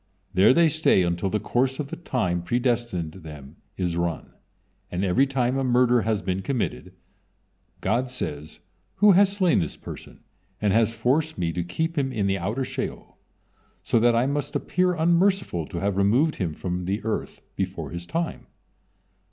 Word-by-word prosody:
There 95 +5 +6
they 170 +4 +5
stay 155 - +3
until 85 +2 -1
the 105 - 0
course 130 +5 0
of 145 -2 -3
the - - -3
time 100 - -1
predestined 120 -5 -1
them 75 -7 -11 0.2
is 90 -2 -1
run; 85 -1 -3 0.6
and 90 +2 -2
every 125 +10 +3
time 130 -1 0
a - - 0
murder 125 -1 +3
has 110 -1 -1
been 95 +1 -1
committed, 100 -6 -3 0.9
God 125 +3 0
says: 75 - -6 0.4
"Who 205 0 +6
has 195 +1 +5
slain 190 -4 +2
this 80 - -3
person - - -10 0.4
and 105 -2 +1
has 115 +1 +2
forced 145 +7 0
Me 85 -2 -1
to 85 +1 -2
keep 160 - -2
him 135 -1 -1
in 110 -5 -1
the 95 0 0
outer 110 +9 -2
Sheol, - - -6 0.6
so 115 - +2
that 120 +1 +4
I 120 +2 +3
must 140 +1 -2
appear 180 0 +1
unmerciful 170 - +2
to - - -7
have 100 -1 0
removed 120 +11 +3
him 85 -6 -2
from 90 -1 -4 0.2
earth 110 0 -4
before 95 -6 -4
his 85 +1 -7
time?" 165 0 -3
115 Hz, 170 wpm, -25 LUFS, 90-140 Hz, 0.9 s, There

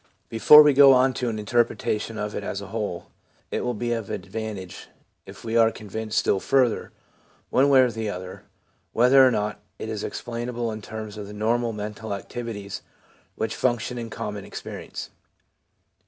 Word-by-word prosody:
Before 150 +7 +8
we 150 -1 +5
go 135 0 +8
on 130 +1 +4
to 125 -1 -2
an 110 - -3
interpretation 110 0 0
of 105 0 -3
it - - -4
as 100 - -4
a 100 -1 -9
whole, 105 -6 -4 0.4
it - - -1
will 125 -1 -1
be 120 +2 -1
of 115 -3 -4
advantage 100 -3 -6 0.4
if - - -12
we 115 0 -3
are 115 -1 +6
convinced 110 +1 -5
still 95 - +2
further, 130 0 +1 0.6
one 135 +2 +4
way 135 -2 +7
or 125 -2 +3
the 110 -1 -3
other, 90 -1 -7 0.5
whether 130 +3 +6
or 130 - +7
not 105 -3 -2 0.2
it 110 - -6
is 110 -2 -4
explainable 120 0 -4
in 110 0 -6
terms 110 0 -7
of 105 -1 -7
the 105 - -9
normal 115 +3 0
mental 105 0 -5
activities 100 -1 -6 0.5
which 110 0 -2
function 120 0 -1
in 115 -1 -6
common 105 -2 -5
experience. - - -8
110 Hz, 170 wpm, -24 LUFS, 105-120 Hz, 0.6 s, Before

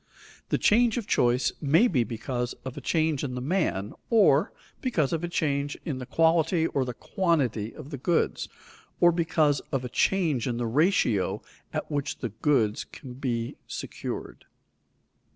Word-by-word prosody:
The - - +2
change 235 +1 +3
of 235 - -2
choice 125 -8 +2
may 160 - +4
be 130 - +2
because 120 +1 -3
of 130 - -5
a 145 - -7
change 155 0 +1
in 130 -3 -3
the - - -3
man, 125 - -1 0.2
or 195 - +4 0.3
because 170 - 0
of 165 0 -1
a - - 0
change 145 -4 -1
in 145 -7 -3
the 125 - -7
quality 165 0 +3
or 140 -5 0
the 125 -1 -5
quantity 135 - 0
of 150 0 -10
the 140 - -5
goods; 165 +5 0 0.5
or 175 - +6
because 160 -4 +2
of 130 -2 -1
a - - -4
change 155 -5 +1
in 120 -2 -1
the 120 - -1
ratio 120 - +2 0.3
at - - -4
which 145 0 -2
the 120 - -4
goods 110 -1 +1
can 130 -3 -11
be 120 -3 -3
secured. - - -6
145 Hz, 165 wpm, -27 LUFS, 125-165 Hz, 0.5 s, or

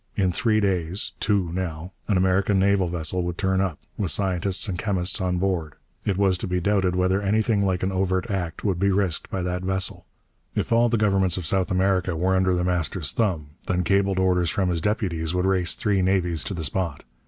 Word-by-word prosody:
In 95 -3 +1
three 110 +4 +1
days 95 -2 0
two, 100 -5 +1
now 90 -1 -4 0.2
an 100 - +2
American 95 +2 +2
naval 95 -1 +3
vessel 85 +1 -1
would 90 0 -3
turn 95 -1 +1
up, 90 -6 -1 0.2
with 100 -5 0
scientists 95 +4 0
and 90 -3 -3
chemists 95 -4 0
on 90 -1 0
board. 90 -6 -1 0.3
It 100 -3 0
was 95 -3 +2
to - - -3
be 90 0 0
doubted 95 -1 +1
whether 95 +2 +1
anything 105 +1 +1
like 95 -2 0
an 95 - 0
overt 95 0 0
act 90 -4 -3
would 95 -4 0
be 100 +1 +2
risked 95 -4 0
by 95 -2 -3
that 90 0 -2
vessel. 95 0 -2 0.5
If - - -2
all 120 +1 +4
the 115 - +1
governments 95 -4 +2
of 90 - -4
South 95 +3 +1
America 95 -1 +1
were 95 +3 +1
under 95 -1 +2
The 90 - 0
Master's 90 -3 0
thumb, 85 -10 -1 0.2
then 90 -1 0
cabled 95 +2 +1
orders 90 -2 +2
from 95 -1 0
his 85 -2 0
deputies 90 -5 -1
would 90 0 +1
race 95 -3 +2
three 105 -5 0
navies 90 -4 +1
to 100 - -4
the 80 - -4
spot. 80 0 -2
95 Hz, 210 wpm, -24 LUFS, 90-100 Hz, 0.5 s, all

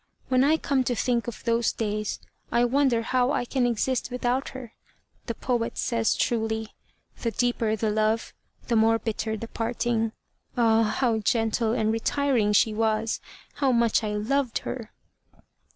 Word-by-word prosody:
When 255 0 +4
I 305 +3 +4
come 275 -4 +1
to 245 - 0
think 240 0 0
of 235 - -6
those 235 0 +2
days 215 -1 -3 0.3
I 240 +1 +3
wonder 250 -2 +2
how 250 +1 +1
I 245 - 0
can 250 0 +1
exist 245 +2 0
without 250 +1 -1
her. 250 -4 -9 0.5
The 230 - -3
poet 240 -1 -2
says 230 -2 +1
truly, 220 -2 -1 0.5
'The 235 - 0
deeper 230 -1 0
the 220 0 -1
love, 215 +1 0 0.3
the 235 - +1
more 225 +1 +4
bitter 220 -1 -3
the 230 - -6
parting.' 230 -1 -1 0.4
Ah! 225 -2 +4
how 225 +1 +1
gentle 225 +1 +1
and 220 -2 +1
retiring 230 -1 +1
she 215 +1 +4
was. 220 0 0 0.4
How 275 -2 +2
much 235 -2 +2
I 210 -1 -2
loved 250 +4 0
her!" 235 -4 -5
230 Hz, 155 wpm, -26 LUFS, 220-245 Hz, 0.5 s, When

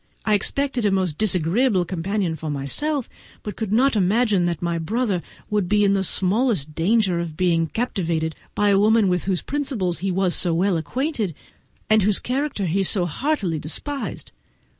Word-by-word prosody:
I 215 - +2
expected 255 +4 0
a 205 - +3
most 185 -5 0
disagreeable 190 +1 +2
companion 185 0 -2
for 155 0 -6
myself, 230 - -1 0.4
but 210 - -5
could 220 -3 -4
not 250 +4 +3
imagine 205 -1 +2
that 170 -2 -1
my 170 -1 -1
brother 205 +1 -1 0.3
would 205 -4 0
be 210 0 +3
in 200 -1 +3
the 195 -1 +1
smallest 190 - +1
danger 185 +1 +2
of 165 -3 -5
being 170 -3 +2
captivated 165 -7 -2 0.2
by 205 0 +2
a 195 -1 +4
woman 215 -1 +4
with 180 -1 0
whose 185 -2 -1
principles 250 - -2
he 195 +3 -2
was 185 -1 +1
so 175 -2 +2
well 185 +2 +2
acquainted, 220 - -2 0.5
and 215 0 +4
whose 200 0 +2
character 260 -5 -2
he 185 +3 0
so 190 -1 +2
heartily 185 - -1
despised. 275 - -5
195 Hz, 170 wpm, -22 LUFS, 170-220 Hz, 0.5 s, a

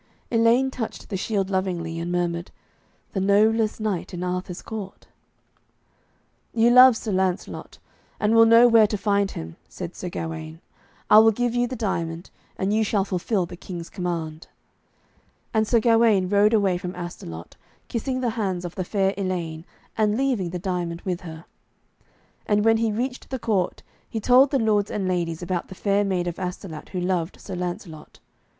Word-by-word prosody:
Elaine 235 +3 +3
touched 230 -4 -6
the 200 - -3
shield 195 0 -1
lovingly, 175 -3 -2
and 170 +1 -3
murmured, 175 -1 -1 0.6
'The 195 - -1
noblest 215 +3 +3
knight 200 -4 -3
in 175 - -4
Arthur's 180 0 -4
court.' 210 -4 -7 1.5
'You 230 +1 +4
love 250 -1 +8
Sir 220 - -4
Lancelot, 185 -1 -2 0.4
and 210 +1 +2
will 225 0 +7
know 230 +2 +7
where 225 -2 +6
to 210 - -2
find 200 -1 +1
him,' 80 - -8
said 175 -1 -7
Sir 180 - -5
Gawaine. 160 -1 -6 0.5
'I 215 - +10
will 220 0 +7
give 245 +2 -1
you 245 0 +1
the 255 - -5
diamond, 170 -6 -3 0.3
and 195 +2 0
you 220 +1 +3
shall 205 -2 +1
fulfil 190 0 -1
the 175 +1 -9
King's 175 -1 -8
command.' 170 -4 -4 1.1
And 220 -1 +2
Sir 235 - +4
Gawaine 225 -5 +3
rode 205 +2 +4
away 195 -4 +2
from 180 0 -6
Astolat, 85 - -8 0.3
kissing 255 +2 -2
the 240 -2 0
hands 190 -6 -2
of 175 - -6
the 185 - -3
fair 195 +1 0
Elaine, 170 -4 -3 0.3
and 215 0 +1
leaving 250 -9 0
the 180 - -4
diamond 175 -2 -3
with 180 -2 -3
her. 160 -2 -9 1.0
And 205 0 +2
when 225 0 +5
he 225 -1 +1
reached 250 +4 -4
the 265 - -3
court 210 -7 -1 0.3
he 225 - -3
told 255 +5 +5
the 275 - +1
lords 210 -4 +1
and 195 -3 -2
ladies 175 -2 -2
about 175 -1 -2
the 190 - -10
fair 200 +2 +1
maid 185 -3 -1
of 175 +1 -4
Astolat 180 -3 -6
who 185 - -4
loved 180 -1 -2
Sir 195 - -8
Lancelot. 175 -3 -6
195 Hz, 170 wpm, -24 LUFS, 175-220 Hz, 1.5 s, I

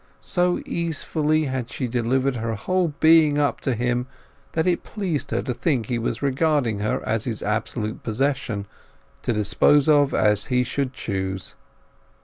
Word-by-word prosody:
So 180 0 +1
easefully 155 -2 0
had 130 -2 -3
she 130 -2 -3
delivered 125 +2 0
her 115 0 -2
whole 185 - 0
being 160 -2 +5
up 145 -1 +1
to 130 - 0
him 120 +2 -1 0.5
that 160 0 +1
it 180 -2 +1
pleased 185 -9 -3
her - - -1
to 125 - -2
think 130 -3 0
he 120 +1 -2
was 115 +2 -3
regarding 140 -5 +1
her 105 +1 -2
as 110 0 0
his 115 -4 -3
absolute 110 +1 -2
possession, 120 -3 -1 0.6
to - - -1
dispose 115 +7 +3
of 145 -2 +5
as 105 -1 +2
he 125 -1 +2
should 130 +1 -2
choose. 95 -6 -4
130 Hz, 155 wpm, -23 LUFS, 115-150 Hz, 0.6 s, being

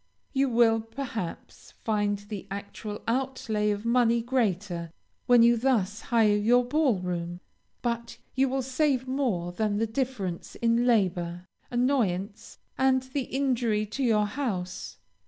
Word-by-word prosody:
You 270 0 +2
will, 230 -2 +4
perhaps, 225 -5 -7
find 205 -2 +1
the 205 -1 -8
actual 205 +1 -6
outlay 230 -4 0
of 205 +1 -2
money 235 -1 +3
greater, 195 -8 -1 0.4
when 245 -1 +7
you 235 0 +6
thus 225 -4 +1
hire 220 -3 +3
your 240 +4 +4
ball 280 -4 +2
room, 175 -1 -4 0.4
but 235 -1 -2 0.2
you 265 0 +2
will 265 0 -1
save 260 0 +1
more 240 -11 -1
than 205 +2 -1
the 225 - +1
difference 220 -7 -3
in 235 +1 +2
labor, 180 -6 +1 0.2
annoyance, 225 -5 -1 0.2
and 260 -1 +3
the 260 0 -3
injury 240 -6 0
to 215 +7 -5
your 215 -4 +3
house. 205 -7 -4
230 Hz, 135 wpm, -27 LUFS, 205-255 Hz, 0.4 s, when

